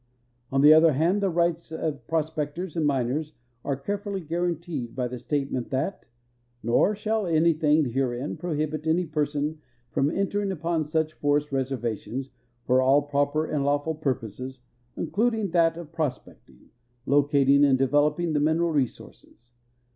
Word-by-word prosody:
On 135 0 +2
the 150 +2 +9
other 160 0 +6
hand, 170 +9 +2
tiie 190 -4 0
rights 170 -1 0
of 155 -3 -4
pros[)ectors 160 +1 -2
and 160 -3 +1
miners 140 +3 -1 0.3
are 140 - -1
care 200 +10 -3
fully 200 -1 -4
guarded 170 -6 -3
by 125 -1 -1
the 125 0 -7
statement 135 -1 -2
that 135 +9 -3 0.3
" 120 0 -42
nor 120 - +3
shall 215 -1 -1
anything 160 -2 +3
herein 130 +1 -2
prohibit 155 -2 -3
an}' 170 +2 +1
person 150 0 -1 0.3
from 140 - +1
entering 200 +3 -1
upon 165 -2 -1
such 155 +1 -1
forest 145 0 0
reservations 130 0 -3 0.3
for 130 +1 +3
all 140 +3 +3
proj)er 145 +2 0
and 145 -2 +1
lawful 145 +3 0
purposes, 130 -3 -4 0.3
including 210 +4 0
that 165 -1 +3
of 170 -3 -9
prospecting, 155 -6 -6 0.3
locating, 140 0 +4
and 135 -2 +5
develo})ing 145 +5 +2
the 150 - +2
mineral 160 +3 +2
resources. 125 -3 -4
150 Hz, 145 wpm, -26 LUFS, 135-165 Hz, 0.3 s, the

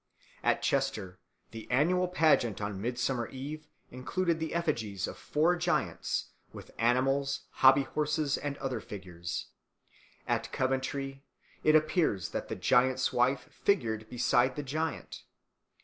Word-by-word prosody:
At - - +2
Chester 95 -3 -1 0.3
the 115 -1 -9
annual 175 +8 +3
pageant 155 - +3
on 100 -2 -4
Midsummer 120 +1 -1
Eve 150 +3 -7 0.2
included 165 +7 -1
the 160 0 -3
effigies 110 - -1
of - - -6
four 150 +6 +1
giants, 170 - -1 0.2
with - - -11
animals, 135 +4 +2
hobby 135 +1 +6
horses, 150 +1 0
and 145 -1 -4
other 130 -2 -3
figures. 90 -5 -6 0.8
At - - -1
Coventry 135 +1 -2 0.4
it 155 - +5
appears 155 - +2
that - - -4
the - - -4
giant's 130 +1 +2
wife 125 +2 +2
figured 110 - 0
beside 125 +1 +2
the 145 - -3
giant. 155 +3 -3
135 Hz, 125 wpm, -30 LUFS, 120-155 Hz, 0.8 s, hobby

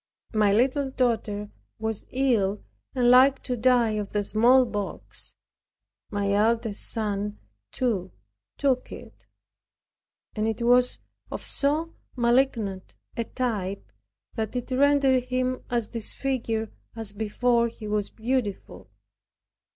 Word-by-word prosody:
My 210 -2 +4
little 265 +6 +2
daughter 225 -5 -1 0.6
ill, 225 -7 +1 0.3
and 245 -1 +4
like 265 +2 +6
to 250 - -2
die 240 -1 +3
of 210 -2 -3
the 205 -1 +1
smallpox; 220 -1 +1 0.7
my 200 -1 -1
eldest 220 +1 +1
son, 210 -2 -1 0.3
too, 200 -8 -1 0.5
took 265 -3 +1
it; - - -12 1.1
and 215 0 0
it 225 +1 -2
was 250 +1 +4 0.3
of - - -5
so 305 +4 0 0.2
malignant 235 -6 +1 0.2
a 230 - -2
type, 200 - -3 0.4
that 220 +1 -3
it 250 +1 -4
rendered 270 -1 +4
him 255 0 -1
as 235 -3 -1
disfigured, 230 -1 -2 0.2
as 220 -3 -3
before 235 +3 +1
he 225 -2 -8
was 210 -1 -1
beautiful. 225 - -3
235 Hz, 110 wpm, -26 LUFS, 210-255 Hz, 1.1 s, like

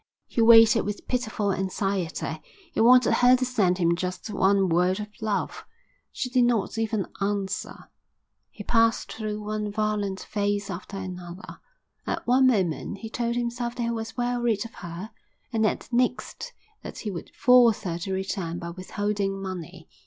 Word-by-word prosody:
He 235 - -1
waited 225 0 +8
with 205 +1 -5
pitiful 220 -5 -1
anxiety. 190 -4 -2 0.3
He - - 0
wanted 250 +2 +6
her 250 +1 +6
to 255 0 0
send 200 -8 +1
him 170 -2 +2
just 185 +4 -4
one 195 -1 +3
word 180 +3 +2
of 210 0 -5
love; 215 -2 -2 0.5
she - - -3
did 250 0 +3
not 230 -4 0
even 220 -3 0 0.2
answer. 200 -1 -3 0.6
He 205 - -10
passed 230 +1 +2
through 215 -1 -4
one 210 0 -3
violent 205 -2 -1
phase 205 -1 -2
after 185 +3 -7
another. 180 0 -8 0.5
At - - -2
one 260 +2 +5
moment 195 -4 0
he 225 +2 -8
told 235 -1 -1
himself 240 0 -2
that 240 - -2
he 235 - 0
was 225 0 -5
well 245 0 0
rid 230 -3 +1
of 230 - -10
her, 175 +5 -7 0.4
and 220 -1 +1
at - - -1
the 240 - -6
next 250 - -1 0.3
that - - -8
he 210 - -4
would 175 - -7
force 245 -4 +5
her 170 -3 -3
to 190 +3 -4
return 190 -3 -3
by 170 0 -6
withholding 195 +2 -2
money. 180 -3 -7
210 Hz, 165 wpm, -26 LUFS, 190-235 Hz, 0.6 s, waited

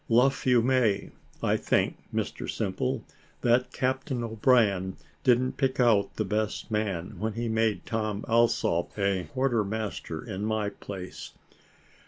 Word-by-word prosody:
Luff 130 +4 +3
you 125 -2 +5
may. 120 -6 +2 0.3
I - - +3
think, - - +1 0.2
Mr - - -3
Simple, 115 +4 -2 0.4
that 120 +1 +3
Captain 130 -1 -1
O'Brien 110 -5 +2 0.3
didn't 125 +1 +3
pick 135 -2 0
out 115 -5 +3
the 110 - -1
best 105 +3 -2
man, 100 -5 -2
when 110 0 -1
he 115 +2 -2
made 110 -1 +1
Tom 110 -2 -2
Alsop 115 -7 +2
a 100 -3 +1
quarter 130 -5 +1
master 100 -6 -4
in 100 -2 -4
my 110 -1 0
place." 95 -3 -8
110 Hz, 135 wpm, -28 LUFS, 100-125 Hz, 0.4 s, you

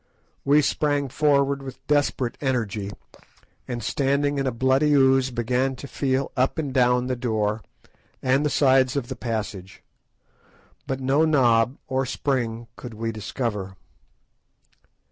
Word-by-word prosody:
We 145 +2 +4
sprang 145 -1 0
forward 140 -1 +2
with 135 -1 -10
desperate 145 -4 0
energy, 110 -7 -1 0.8
and, 120 -2 -4
standing 140 +1 0
in 135 - 0
a - - +1
bloody 130 +5 +2
ooze, 135 -1 +4
began 125 +2 -1
to 140 - -9
feel 135 -1 -1
up 130 +3 +1
and 145 -5 -3
down 125 -1 +3
the 130 0 -1
door 110 -3 -1 0.6
and 135 +2 +2
the 150 - +1
sides 130 -1 +3
of 135 -4 -2
the - - -4
passage. 105 -5 -5 1.0
But 135 0 -3
no 135 +4 +2
knob 125 -5 +3
or 130 -1 -1
spring 120 -4 -2
could 120 -2 -9
we 115 +1 -3
discover. 105 -3 -4
130 Hz, 135 wpm, -24 LUFS, 120-140 Hz, 1.0 s, We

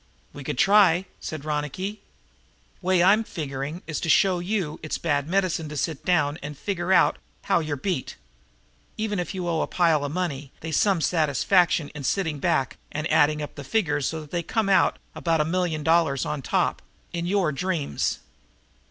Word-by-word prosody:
"We 145 - -8
could 130 - -4
try," 190 0 +5
said 155 -2 -6
Ronicky. 155 +8 -3 0.8
"Way 185 -1 +3
I'm 205 +5 +5
figuring 145 -2 -5
is 155 - -3
to 165 - -3
show 190 0 +4
you 175 -4 -2
it's 155 - -3
bad 145 -3 0
medicine 180 -4 0
to 150 - -6
sit 155 -1 -2
down 155 -4 +1
and 150 0 -7
figure 185 0 -2
out 190 - +4 0.2
how - - +2
you're 155 -3 -2
beat. 165 -1 -3 0.8
Even 215 -3 -1
if 180 +2 -4
you 180 -2 -3
owe 165 -2 0
a - - -1
pile 165 -4 +2
of 145 - -3
money 150 -6 -3
they's 160 -1 -3
some 195 -5 +3
satisfaction 165 +1 +2
in 150 -1 -8
sitting 160 -1 -1
back 135 -1 0
and 150 +1 -3
adding 150 -1 +3
up 150 - -7
the 140 - -8
figures 145 - 0
so 160 -1 -4
that 150 - -8
you 170 - 0
come 215 +4 0
out 195 - +4 0.2
about 165 -2 0
a 150 - +2
million 165 -2 -1
dollars 160 -4 +2
on 150 -2 -3
top - - 0 0.3
in 170 0 -2
your 190 -4 +2
dreams. 160 0 -2
165 Hz, 180 wpm, -25 LUFS, 150-185 Hz, 0.8 s, try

